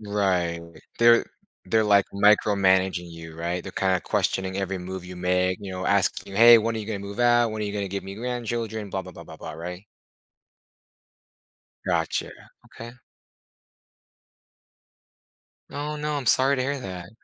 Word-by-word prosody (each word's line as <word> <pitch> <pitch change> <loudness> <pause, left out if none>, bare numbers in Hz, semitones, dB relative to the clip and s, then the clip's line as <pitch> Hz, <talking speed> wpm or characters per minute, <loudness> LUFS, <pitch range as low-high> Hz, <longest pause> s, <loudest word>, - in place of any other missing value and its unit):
Right. 95 -5 0 0.4
They're 115 0 +6 0.4
they're, 110 -1 +2
like, 100 -2 +4
micromanaging 95 -3 +3
you, 80 -1 -10
right? 85 +2 -3
They're - - -8
kinda 95 -1 +1
questioning 95 0 -1
every 95 -1 -2
move 90 0 -7
you 90 0 -9
make, 90 +1 0
you 100 -2 -7
know, 95 0 -5
asking 100 0 0
you, - - -6
"Hey, 120 0 +10
when 115 +1 0
are - - -3
you 105 - -6
gonna 105 -2 -3
move 100 +3 -7
out? 120 -1 +4
When 110 0 -5
are - - -1
you 100 - -4
gonna 100 -2 -2
give 100 +1 -4
me 95 - -7
grandchildren?" 115 -2 -4
Blah 95 0 -3
blah 90 - -11
blah - - -11
blah - - -12
blah, - - -8
right? 90 +4 -7 2.0
Gotcha. 80 -1 -1 0.4
Okay. 115 +1 -10 2.8
Oh, 150 +1 -4
no. 150 0 -3
I'm 140 -3 -5
sorry 135 +3 +4
to 130 - 0
hear 140 0 -2
that. 90 -4 -7
100 Hz, 165 wpm, -25 LUFS, 90-115 Hz, 2.8 s, Hey